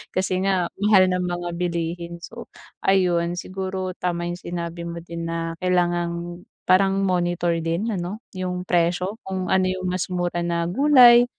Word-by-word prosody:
kasi 185 0 0
nga 185 -3 +1
mahal 195 -2 +5
ng 180 0 0
mga 175 0 -3
bilihin. 170 0 -3
So 235 +5 -9 0.4
ayun, 175 -3 +2
siguro, 185 0 -4
tama 175 -1 -2
'yung 175 0 -5
sinabi 170 -1 -5
mo 170 0 -6
din 170 0 -6
na 165 0 -3
kailangang 175 -1 -1 0.2
parang 195 +1 +4
monitor 175 -2 +1
din 165 +7 -1
ano, 195 +3 -4 0.2
'yung 180 -1 -2
presyo 180 +3 0
kung 190 -1 -3
ano 190 0 +3
'yung 185 0 -2
mas 185 0 -1
mura 175 -1 -2
na 170 0 0
gulay 245 +1 +7
180 Hz, 155 wpm, -23 LUFS, 170-185 Hz, 0.4 s, gulay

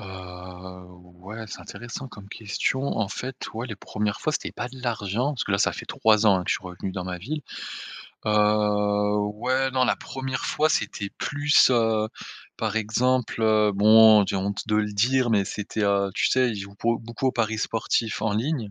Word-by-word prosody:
Heu, 110 - -9 1.2
ouais, 110 +3 -7
c'est - - -8
intéressant 120 +3 -8
comme 105 -2 -12
question 110 +6 -2 0.2
en 100 -3 0
fait. 130 +3 -5 0.2
Ouais, 115 +3 -4
les 110 - -6
1res 105 +1 -3
fois, 155 - 0
c'était - - -3
pas 120 - -4
de 130 0 -12
l'argent. 120 +2 -1
Parce 120 - -2
que - - -5
là 100 - +2
ça - - +2
fait - - -8
3 110 0 +3
ans 100 - +6
hein, 90 - -4
que - - -2
je - - +3
suis - - -6
revenu 90 +1 -6
dans 90 -2 -4
ma 90 -1 -4
ville, 150 - -4 0.9
heu, 105 -1 +2 0.2
ouais 130 +4 0
non, 130 -1 +2
la - - +2
1re 130 -1 -5
fois 155 +1 +2
c'était 100 -4 -1
plus, 145 -1 +4
heu, 110 -3 +2 0.5
par - - -2
exemple, 120 +3 +1
heu 110 -1 +4
bon 110 0 +7
j'ai - - -2
honte 100 +3 -3
de 105 - 0
le 105 -1 0
dire 120 +4 +2
mais 100 -3 +3
c'était, 105 +2 -3
heu 100 -1 +2
tu - - +2
sais, 130 -1 +3
il 110 - -4
joue 100 0 -8
beau 115 0 +2
beaucoup 115 +3 -4
aux 130 - +2
paris 110 -1 -1
sportifs 110 0 -1
en 110 - 0
ligne, 115 -1 -1
110 Hz, 200 wpm, -25 LUFS, 105-125 Hz, 1.2 s, bon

